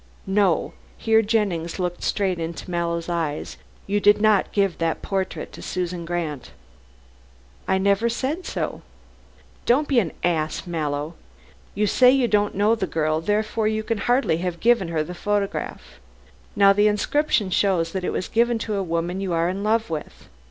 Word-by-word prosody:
No," 195 -3 +1 0.2
here 225 0 +3
Jennings 200 -7 -1
looked 180 -1 -3
straight 190 -4 0
into 165 +2 -5
Mallow's 170 -1 -2
eyes, 165 -4 -3 0.3
"you 205 +1 0
did 205 +1 +5
not 215 -2 +3
give 195 -3 0
that 165 -1 -1
portrait 190 -1 -3
to - - -11
Susan 180 -1 -3
Grant." 165 -5 -4 1.2
"I 190 - +2
never 200 +4 +2
said 270 +9 -2
so." - - -3 0.9
"Don't 285 +5 +3
be 265 -4 +3
an 180 -8 -1
ass, 160 -2 0
Mallow. 150 -2 -3 0.6
You 210 +1 +1
say 250 +5 +5
you 260 -1 +3
don't 205 -2 +1
know 205 +3 +3
the 210 -5 -1
girl, 155 0 0
therefore 215 +4 0
you 220 0 -1
can 225 -1 -2
hardly 245 -7 +2
have 175 -1 -3
given 235 -6 +3
her 160 -2 -1
the 180 - -7
photograph. 205 +2 -3 0.6
Now 195 0 +6
the 205 +1 +4
inscription 210 0 +1
shows 175 -3 +1
that 190 0 -3
it - - -1
was 185 - -3
given 235 +1 +2
to 215 -2 -2
a - - 0
woman 175 +1 -2
you 190 -3 -2
are 165 +1 +1
in 195 +2 -3
love 220 -3 +1
with. 155 -2 -7
195 Hz, 170 wpm, -23 LUFS, 170-215 Hz, 1.2 s, Now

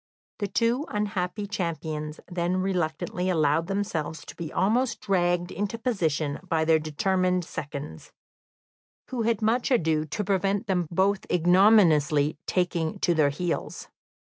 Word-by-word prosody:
The 205 - -1
two 235 - 0
unhappy 205 -1 -2
champions 160 -5 -4
then 175 0 -1
reluctantly 180 -1 -1
allowed 160 -1 +2
themselves 195 -6 -3
to - - -10
be 165 -2 -6
almost 230 +7 +1
dragged 175 -2 +1
into 205 +3 -3
position 160 - -1
by 160 -2 +1
their 160 0 +4
determined 180 +3 0
seconds, 140 - -7 1.0
who 250 -2 -2
had 225 -1 0
much 235 +4 +1
ado 160 - +2
to 210 +7 -3
prevent 195 +2 0
them 180 -5 0
both 190 +3 +1
ignominiously 170 -5 +4
taking 175 -3 0
to 175 - +3
their 155 -3 +3
heels. 170 +4 -4
180 Hz, 130 wpm, -26 LUFS, 160-200 Hz, 1.0 s, their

